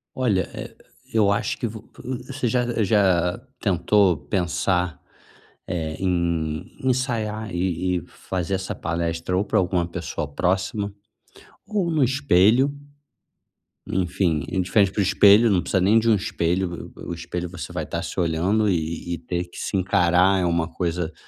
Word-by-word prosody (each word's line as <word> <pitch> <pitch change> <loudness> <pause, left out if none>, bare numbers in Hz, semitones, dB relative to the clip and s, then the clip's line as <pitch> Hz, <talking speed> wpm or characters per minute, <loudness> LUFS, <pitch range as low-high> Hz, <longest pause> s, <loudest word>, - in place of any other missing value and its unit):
Olha, 105 -8 +1
eh, - - -8 0.4
eu 105 -3 +4
acho 105 +4 0
que 120 - -1
vo 110 -1 -8 0.4
você 135 -3 -2
já 120 -1 0
já 95 -2 +2 0.2
tentou 95 -1 +3
pensar, 90 0 -1 0.7
eh, 80 -3 -3
em 85 -4 -1 0.2
ensaiar 115 -5 -1
e 90 0 0
e - - -5
fazer 95 0 -4
essa 95 0 -3
palestra 85 +2 -2
ou 100 - +1
pra - - +1
alguma 90 -2 +1
pessoa 85 -4 -4
próxima 100 - -1 0.7
ou 200 -5 -1
no 155 -4 +2
espelho? 130 0 +3 1.1
Enfim, 90 -4 0
em 95 -1 0
frente 100 +1 +3
pro 100 - 0
espelho, 105 +4 +6
não 90 -3 +3
precisa 95 +2 0
nem 105 +5 +5
de 115 +1 +1
um 110 - +6
espelho, 90 -1 0
v 85 - -5 0.3
v - - -9
o 85 - -2
espelho 85 +1 -5
você 90 -4 -7
vai - - -3
estar - - -4
se - - -7
olhando 90 +6 +1
e 85 -1 -2
e 85 - -5
ter 85 +1 -3
que 85 - -13
se 100 - -2
encarar, 95 0 +3
é 90 - +1
uma 85 -1 0
coisa 85 -1 -2
95 Hz, 160 wpm, -23 LUFS, 85-105 Hz, 1.1 s, espelho